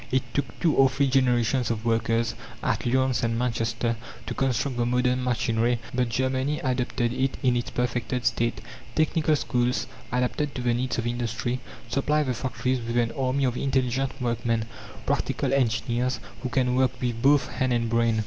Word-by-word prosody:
It 130 0 +2
took 135 -4 -2
two 165 -4 +3
or 135 -1 +5
three 140 +2 +1
generations 125 -2 +2
of 115 -1 -2
workers, 115 0 +1 0.3
at - - 0
Lyons 130 -1 +2
and 115 0 +1
Manchester, 115 -1 0 0.3
to - - -3
construct 130 0 0
the 120 - +1
modern 125 +1 +1
machinery; 120 -1 +1 0.2
but 125 -1 +1
Germany 130 +4 0
adopted 125 -2 0
it 130 +1 0
in 125 -2 +3
its 120 - -1
perfected 125 0 -1
state. 115 0 +1 0.3
Technical 155 0 +2
schools, 125 -3 0 0.3
adapted 125 +4 0
to 125 - -3
the 120 -1 +2
needs 125 +1 -1
of 115 - -1
industry, 120 +1 -2 0.3
supply 150 +5 +1
the 130 -3 -1
factories 130 0 -1
with 115 +1 -2
an 115 -1 +2
army 130 +2 0
of 125 -2 +1
intelligent 135 0 0
workmen 115 -2 0 0.4
practical - - 0
engineers, 120 -1 +1 0.2
who 130 - -3
can 125 -2 +1
work 130 -1 +1
with 120 -3 -2
both 145 +2 +4
hand 130 -1 0
and 120 -1 +1
brain. 115 -1 +2
125 Hz, 170 wpm, -26 LUFS, 115-130 Hz, 0.4 s, or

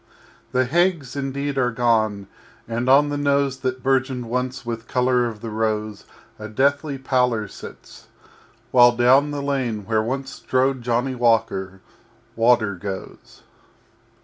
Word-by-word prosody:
_] - - -13
III 130 - +4
The - - -3
Haigs 165 -3 +1
indeed 140 0 -3
are 125 -1 +2
gone, 110 -4 +1 0.4
and 120 +2 -2
on 145 +2 +5
the 145 0 -2
Nose 140 -2 +1
That 130 -1 -3
bourgeoned 130 -2 0
once 125 +2 -3
with 115 -1 -5
color 125 -1 +1
of 110 -3 -8
the 115 - -6
rose 110 -1 -2 0.3
A 110 - -6
deathly 140 +5 0
Pallor 125 -5 0
sits, - - -12 0.6
while 120 -1 +6
down 130 +4 +4
the 145 -1 -4
lane 125 -7 -2
Where 110 +1 +1
once 130 +4 -3
strode 130 0 0
Johnny 120 +2 -1
Walker 110 -6 0 0.5
Water 115 -3 +3
goes. 95 +1 -8
125 Hz, 145 wpm, -22 LUFS, 115-135 Hz, 0.6 s, while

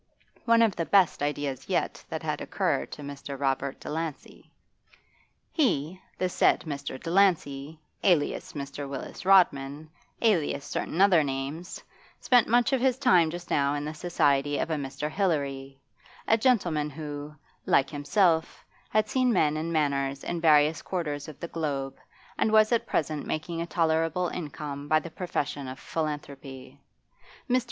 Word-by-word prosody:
One 230 -1 +5
of 220 -4 +2
the 165 - -2
best 195 -7 +4
ideas 145 -2 -2
that - - -3
had - - -2
yet - - -10
occurred 65 - -1
to 145 - -8
Mr. 140 -1 -7
Robert 135 0 -1
Delancey. 160 -1 -6 1.0
He 185 - 0 0.2
the 185 - 0
said 180 - +3
Mr. 140 -3 -5
Delancey, 160 -5 +1 0.2
alias 170 -6 +1
Mr. 140 -1 -6
Willis 140 +6 -7
Rodman, 155 -5 +3 0.3
alias 165 -10 +1
certain 160 +4 -2
other 185 -5 +6
names 140 +5 -5 0.4
spent 245 -2 +4
much 240 +4 +3
of 260 - +2
his 260 -1 +2
time 175 -9 +4
just 175 +2 -8
now 140 0 +2
in 145 0 -3
the 155 - -4
society 145 -4 +1
of 165 - -2
a - - +1
Mr. 140 0 -4
Hilary, 140 -6 -2 0.5
a 225 - +5
gentleman 185 - +1
who, 150 0 -7 0.3
like 135 0 +3
himself, 160 +3 +1 0.2
had 215 0 +2
seen 255 -1 +2
men 155 -7 +2
and 160 +2 -3
manners 140 -3 0
in 175 -1 -3
various 155 -1 +4
quarters 150 -6 -3
of 155 -3 -10
the 170 - -5
globe, 140 -5 -3 0.4
and 220 - +2
was 215 0 +5
at 235 - +1
present 155 -1 -1
making 165 +2 -3
a 170 - -3
tolerable 165 +1 +1
income 145 -3 -6
by 155 +1 +4
the 165 +1 -9
profession 145 -6 -3
of 130 +1 -7
philanthropy. 140 -4 -6 0.7
Mr. 255 -1 +3
155 Hz, 150 wpm, -27 LUFS, 140-180 Hz, 1.0 s, other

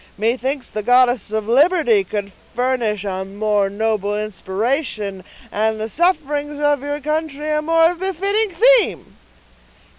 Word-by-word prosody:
Methinks 255 +5 -1
the 215 - -3
goddess 245 0 +3
of 215 0 -3
Liberty 270 - +3
could 200 +1 -5 0.2
furnish 240 -5 0
a 190 -1 -3
more 205 0 0
noble 210 0 -1
inspiration, 210 0 -3 0.3
and 220 +1 0
the 220 +1 -3
sufferings 295 - -1
of 290 -2 +1
your 290 +1 -3
country 305 0 -3
a 300 0 +1
more 330 +2 +3
befitting 390 +4 -1
theme." 485 +6 +3
250 Hz, 125 wpm, -19 LUFS, 210-305 Hz, 0.3 s, goddess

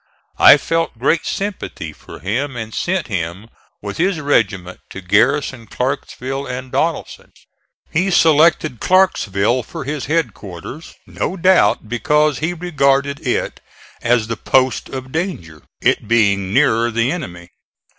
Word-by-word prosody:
I - - +9
felt 165 -3 -2
great 145 +7 +1
sympathy 185 - -4
for - - -13
him 125 - -2
and 110 -2 -6
sent 185 -2 -1
him, 95 +1 -4 0.3
with 100 -1 -5
his 180 0 +1
regiment, 100 -10 0
to - - -8
garrison 115 +5 +1
Clarksville 135 +2 -3
and 130 0 -6
Donelson. - - -2 0.6
He 185 +5 +1
selected 155 - +3
Clarksville 125 - +2
for 155 +6 -8
his 145 0 -4
headquarters, 145 - -4
no 190 - -4
doubt 185 - +3
because 150 +6 +1
he 160 +3 -1
regarded 140 -5 0
it - - -1 0.4
as 115 -2 +2
the 115 0 -4
post 130 +2 +1
of 130 -1 -7
danger, 130 - -4 0.2
it - - +1
being 100 -4 +2
nearer 120 -2 +3
the 115 +2 0
enemy. 90 - -7
130 Hz, 130 wpm, -18 LUFS, 110-155 Hz, 0.6 s, I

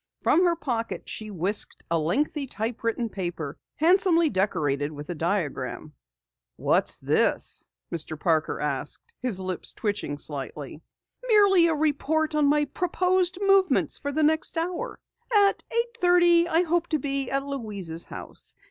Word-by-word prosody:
From 350 - +4
her 345 -1 +3
pocket 240 -8 -4
she 215 -1 -6
whisked 195 +2 -1
a 165 - +2
lengthy 275 - -1
typewritten 230 0 -2
paper, 175 -7 -5 0.2
handsomely 335 -1 +4
decorated 155 -8 0
with 145 +2 -7
a - - -2
diagram. 155 -4 -3 0.6
"What's - - +2
this?" - - +1 0.2
Mr. 155 -2 -4
Parker 160 0 0
asked, 465 - -3
his 245 -7 -1
lips 185 -1 -3
twitching 205 -9 -3
slightly. 145 0 -5 0.5
"Merely 400 -6 +5
a 325 - +1
report 310 +1 0
on 300 -1 +3
my 295 +1 +3
proposed 360 +3 +1
movements 390 -1 +3
for 285 - -3
the 310 +2 0
next 315 +2 +1
hour. 340 +2 -3 0.3
At 405 -3 +4
eight 470 0 -1
thirty 350 -1 +5
I 345 0 +3
hope 345 0 0
to 315 - 0
be 275 -2 0
at 275 0 -1
Louise's 205 -12 -4
house. - - -9
275 Hz, 140 wpm, -26 LUFS, -, 0.6 s, Merely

